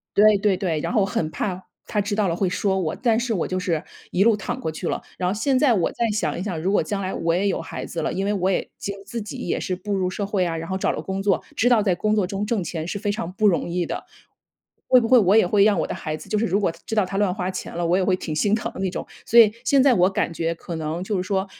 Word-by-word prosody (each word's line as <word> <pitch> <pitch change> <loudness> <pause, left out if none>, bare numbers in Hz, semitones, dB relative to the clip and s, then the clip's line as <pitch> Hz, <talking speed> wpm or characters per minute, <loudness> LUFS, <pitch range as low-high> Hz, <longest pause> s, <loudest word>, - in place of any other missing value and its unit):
对 210 0 +6
对 200 -2 +2
对。 165 -5 -1
然 - - -3
后 215 - +3
我 195 - +3
很 160 -5 -2
怕 185 -2 -3 0.2
他 210 - -1
知 205 +1 -2
道 210 -2 +1
了 165 - -1
会 195 - +1
说 190 0 0
我。 160 -4 -2
但 230 -3 +1
是 240 -1 -1
我 180 - 0
就 185 - -2
是 170 -3 -1 0.3
一 190 - +3
路 225 -2 +4
躺 240 +5 -4
过 160 - -2
去 155 - -5
了， - - -2 0.2
然 180 -1 0
后 - - 0
现 260 +5 +1
在 270 -4 +4
我 180 -5 +1
再 235 - 0
想 210 -4 -1
一 180 - -3
想， 185 -6 -3
如 190 - 0
果 205 - +3
将 200 -2 -3
来 190 -1 -3
我 165 0 0
也 195 +3 +1
有 - - -1
孩 - - -6
子 165 - -4
了， - - -1
因 195 - -1
为 205 - +1
我 190 -1 0
也 - - +1 0.2
就 200 - -4
自 230 +3 -5
己 210 - -7
也 - - 0
是 185 - -2
步 200 +3 -4
入 185 -1 0
社 200 +2 -3
会 195 -2 0
啊， 165 -1 -2
然 165 +1 -6
后 190 - -1
找 - - +1
了 - - -4
工 190 0 -3
作， 200 -2 +1
知 245 - +3
道 230 -4 +4
在 190 -3 +2
工 215 +4 +1
作 205 -3 +2
中 200 +1 -3
挣 210 -3 -1
钱 165 -1 -4
是 200 - -3
非 205 -1 -1
常 200 -5 -4
不 215 +2 0
容 180 -3 +2
易 175 0 -1
的。 - - -5 0.8
会 255 - +7
不 230 - -1
会 255 - +7
我 200 0 +4
也 220 - +5
会 200 +2 +4
让 210 -2 +3
我 - - -1
的 - - -3
孩 155 - -4
子， - - -13
就 215 - +1
是 225 - +1
如 195 +1 +1
果 180 - +1
知 220 - -3
道 210 -3 +3
他 195 +1 -4
乱 200 -3 +2
花 185 -2 -2
钱 185 - -6
了， 175 0 -1
我 175 +2 +3
也 190 - +1
会 185 - +3
挺 165 -3 -5
心 205 +7 +2
疼 225 - -4
的 - - -9
那 190 - 0
种。 180 - -5 0.2
所 235 - +2
以 220 -3 +8
现 275 -2 +4
在 270 -3 +5
我 185 -2 +4
感 190 -3 -1
觉 165 0 -1
可 170 - -7
能 160 +2 -3
就 200 0 -2
是 180 - -1
说 190 0 -1
195 Hz, 340 characters per minute, -23 LUFS, 180-210 Hz, 0.8 s, 以